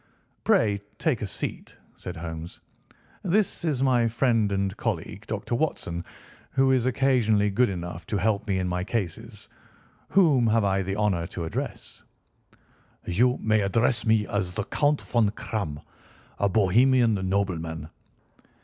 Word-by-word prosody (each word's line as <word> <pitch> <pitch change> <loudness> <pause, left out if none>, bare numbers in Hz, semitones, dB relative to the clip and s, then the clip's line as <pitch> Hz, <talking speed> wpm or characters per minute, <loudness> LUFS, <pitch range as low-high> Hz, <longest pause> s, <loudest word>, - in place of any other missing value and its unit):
"Pray 100 -2 +2 0.2
take 150 -9 0
a 105 - -2
seat," - - -5 0.2
said - - -8
Holmes. 80 0 -7 0.6
"This 195 0 +1
is 145 -6 0
my 125 -3 +3
friend 115 -3 +1
and 95 -1 -1
colleague, 105 +2 -4
Dr. 110 +2 -4
Watson, 85 - -2 0.5
who 135 0 +3
is 130 -2 +2
occasionally 115 -6 +2
good 120 +4 +3
enough 85 -2 -6
to 105 - -1
help 105 +1 0
me 95 -2 +1
in 95 -1 -1
my 90 0 -1
cases. 95 -3 -4 0.6
Whom 150 -11 +4
have 110 0 +3
I 95 -1 +1
the 95 +1 -3
honour 100 -5 0
to 85 -1 -5
address?" 80 - -6 1.0
"You 120 +8 +2
may 110 -1 +3
address 115 +4 +1
me 110 -1 +3
as 95 -4 -2
the 105 - -1
Count 145 +7 +1
Von 115 -4 +2
Kramm, 95 -12 -4 0.6
a 100 - +2
Bohemian 115 +5 +4 0.2
nobleman. 85 -5 -2
105 Hz, 140 wpm, -26 LUFS, 95-120 Hz, 1.0 s, Whom